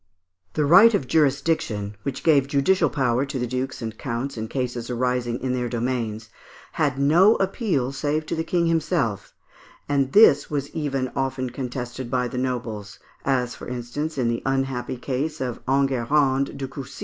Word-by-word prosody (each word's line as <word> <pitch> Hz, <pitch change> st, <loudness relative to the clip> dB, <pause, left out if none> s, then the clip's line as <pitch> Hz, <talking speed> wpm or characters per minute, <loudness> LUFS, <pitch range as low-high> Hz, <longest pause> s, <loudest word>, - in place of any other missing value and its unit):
The 150 Hz, -, +1 dB
right 190 Hz, +10 st, +8 dB
of 145 Hz, -, -1 dB
jurisdiction, 135 Hz, -8 st, 0 dB
which 135 Hz, +4 st, -4 dB
gave 145 Hz, -5 st, +4 dB
judicial 155 Hz, +4 st, +2 dB
power 125 Hz, -2 st, +1 dB
to 140 Hz, -1 st, -4 dB
the 125 Hz, -, -1 dB
dukes 130 Hz, +1 st, -3 dB
and 110 Hz, 0 st, -4 dB
counts 120 Hz, +5 st, -4 dB
in 110 Hz, -1 st, -4 dB
cases 125 Hz, -1 st, -3 dB
arising 125 Hz, -1 st, -1 dB
in 130 Hz, 0 st, -1 dB
their 125 Hz, -1 st, -1 dB
domains, 115 Hz, -3 st, -2 dB, 0.4 s
had 145 Hz, -4 st, 0 dB
no 170 Hz, +10 st, +5 dB
appeal 190 Hz, -, 0 dB
save 150 Hz, +3 st, -1 dB
to -, -, -3 dB
the 160 Hz, -, -1 dB
King 170 Hz, 0 st, +1 dB
himself, 160 Hz, -, -1 dB, 0.5 s
and 140 Hz, -2 st, +1 dB
this 175 Hz, -9 st, +6 dB
was 145 Hz, -2 st, -3 dB
even 135 Hz, -4 st, -2 dB
often 130 Hz, -2 st, -2 dB
contested 125 Hz, -1 st, -5 dB
by 125 Hz, -1 st, 0 dB
the 125 Hz, -, -4 dB
nobles, 115 Hz, -6 st, -4 dB, 0.3 s
as 125 Hz, -3 st, +1 dB
for -, -, -10 dB
instance, 125 Hz, +6 st, -4 dB
in 125 Hz, -3 st, +1 dB
the 115 Hz, 0 st, -1 dB
unhappy 135 Hz, -2 st, -1 dB
case 145 Hz, +5 st, -3 dB
of 125 Hz, -3 st, -3 dB
Enguerrand 135 Hz, +1 st, +1 dB
de 135 Hz, -1 st, -4 dB
Coucy. 135 Hz, -1 st, -9 dB
130 Hz, 165 wpm, -24 LUFS, 125-145 Hz, 0.5 s, right